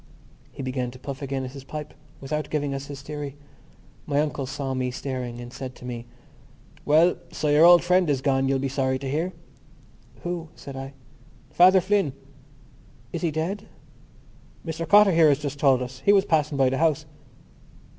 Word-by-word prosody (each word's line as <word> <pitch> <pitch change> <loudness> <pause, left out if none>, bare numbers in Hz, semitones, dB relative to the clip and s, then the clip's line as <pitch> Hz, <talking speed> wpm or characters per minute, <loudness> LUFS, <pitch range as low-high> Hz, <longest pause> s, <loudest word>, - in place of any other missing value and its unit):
He - - -7
began 130 -1 -2
to 125 - -11
puff 140 +2 -7
again 135 -1 -3
at 130 - -7
his 135 -1 -10
pipe 150 +2 -7 0.3
without 150 +3 -3
giving 145 -2 -1
us 135 0 -5
his 140 -1 -8
theory. 145 -1 -6 0.7
My 145 -1 +1
uncle 145 -3 -1
saw 135 0 -3
me 130 -1 -1
staring 125 -2 -5
and 120 0 -9
said 130 -2 -7
to - - -12
me: 120 -1 -6 0.8
"Well, 160 +4 +4
so 150 - -1
your 150 +3 +6
old 175 0 +8
friend 180 -1 +3
is 140 -3 +2
gone, 135 0 +1
you'll 135 - +2
be 135 +1 -1
sorry 130 -1 0
to 135 +1 -6
hear." 160 +7 -1 0.9
"Who?" 175 -2 -4
said 140 - -9
I. 135 +1 -7 0.6
"Father 185 +2 +6
Flynn." 195 -7 +1 1.0
"Is 170 - -3
he 170 - +1
dead?" 180 +7 -3 1.0
"Mr 165 0 -4
Cotter 205 -1 +7
here 165 -2 +5
has 140 - +3
just 145 -1 -5
told 135 -3 +4
us. 125 +1 -8
He 200 - +5
was 195 -1 +4
passing 150 -5 +1
by 130 -1 +3
the 135 - -1
house." 155 -1 +2
140 Hz, 185 wpm, -25 LUFS, 135-160 Hz, 1.0 s, old